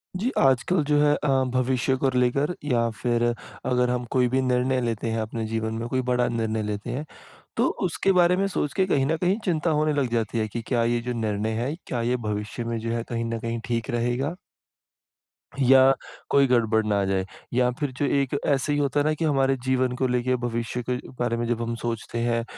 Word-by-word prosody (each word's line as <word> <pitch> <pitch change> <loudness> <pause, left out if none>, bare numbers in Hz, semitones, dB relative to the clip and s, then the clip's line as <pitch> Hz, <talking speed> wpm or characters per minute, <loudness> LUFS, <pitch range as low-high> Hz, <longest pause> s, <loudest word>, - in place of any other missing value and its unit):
जी, 220 +8 0
आजकल 135 +6 +3
जो 150 0 +2
है 145 0 +4
अ, 150 - -3 0.3
भविष्य 130 +1 +1
को 135 - +4
लेकर 140 +7 +1
या 120 -5 +1
फिर 120 -1 +1 0.4
अगर 125 -1 +2
हम 125 0 -1
कोई 125 -2 +3
भी 130 +2 +1
निर्णय 130 0 +1
लेते 115 -2 -2
हैं 115 - -1
अपने 110 +1 -4
जीवन 110 0 -2
में, 115 +1 -3
कोई 130 0 0
बड़ा 125 0 +2
निर्णय 110 -1 -1
लेते 105 0 -4
हैं, 145 +5 -3 0.5
तो - - +3 0.2
उसके 195 - +1
बारे 180 -1 +4
में 195 +1 +1
सोच 150 -6 -2
के 190 - +2
कहीं 135 -7 +2
न 160 +3 +1
कहीं 180 +5 +1
चिंता 165 -3 +1
होने 155 0 +2
लग 130 - 0
जाती 115 -1 0
है 110 -1 0
कि 115 +2 -5
क्या 115 0 0
ये 120 0 +1
जो - - 0
निर्णय 105 0 -1
है, 135 +5 -2
क्या 120 - -2
ये 125 - +2
भविष्य 105 +3 -3
में 115 0 -2
जो 115 +1 -3
है 115 - -1
कहीं 115 -1 -2
न 115 0 -2
कहीं 115 0 -3
ठीक 115 -1 -2
रहेगा? 120 +7 -1 1.3
या 135 0 +8 0.4
कोई 140 -1 +4
गड़बड़ 110 -3 +2
ना 105 -1 +1
आ - - 0
जाए, 95 -1 0 0.3
या 125 0 +3
फिर 145 -3 -1
जो 145 - +1
एक 140 0 +1
ऐसे 140 +1 +1
ही 145 - +1
होता 145 0 +1
है 145 - +1
ना 155 - +2
कि 160 +2 -2
हमारे 135 -3 +2
जीवन 130 -1 +2
को 130 - 0
लेके 125 +1 +1
भविष्य 120 0 -3
के 125 - +1 0.2
बारे 120 -1 0
में 120 - -1
जब 120 -1 -1
हम 115 0 -2
सोचते 115 0 -3
हैं, 115 0 0
125 Hz, 225 wpm, -25 LUFS, 115-135 Hz, 1.3 s, या